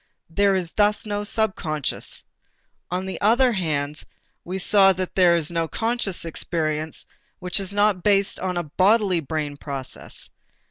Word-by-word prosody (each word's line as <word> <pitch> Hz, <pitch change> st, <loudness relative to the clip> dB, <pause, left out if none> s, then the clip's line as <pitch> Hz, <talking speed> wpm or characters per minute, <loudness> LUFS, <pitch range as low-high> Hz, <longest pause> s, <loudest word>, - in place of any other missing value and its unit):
There 200 Hz, +2 st, +3 dB
is 175 Hz, -3 st, -2 dB
thus 210 Hz, +1 st, +2 dB
no 205 Hz, -1 st, -2 dB
subconscious. 190 Hz, -, -2 dB, 0.6 s
On 180 Hz, +1 st, -2 dB
the 190 Hz, -, -6 dB
other 245 Hz, +5 st, +4 dB
hand, 150 Hz, -7 st, -2 dB, 0.4 s
we 185 Hz, +2 st, -4 dB
saw 195 Hz, 0 st, +5 dB
that 185 Hz, 0 st, -4 dB
there 180 Hz, -2 st, +5 dB
is 165 Hz, -1 st, -1 dB
no 165 Hz, -1 st, -1 dB
conscious 225 Hz, -4 st, -1 dB
experience 155 Hz, -1 st, -2 dB, 0.3 s
which 180 Hz, +1 st, +1 dB
is 195 Hz, -1 st, +1 dB
not 205 Hz, -2 st, +2 dB
based 200 Hz, 0 st, +2 dB
on 180 Hz, -1 st, -2 dB
a 175 Hz, -, -1 dB
bodily 190 Hz, +3 st, +2 dB
brain 150 Hz, -1 st, -4 dB
process. 140 Hz, -3 st, -5 dB
185 Hz, 145 wpm, -23 LUFS, 160-205 Hz, 0.6 s, saw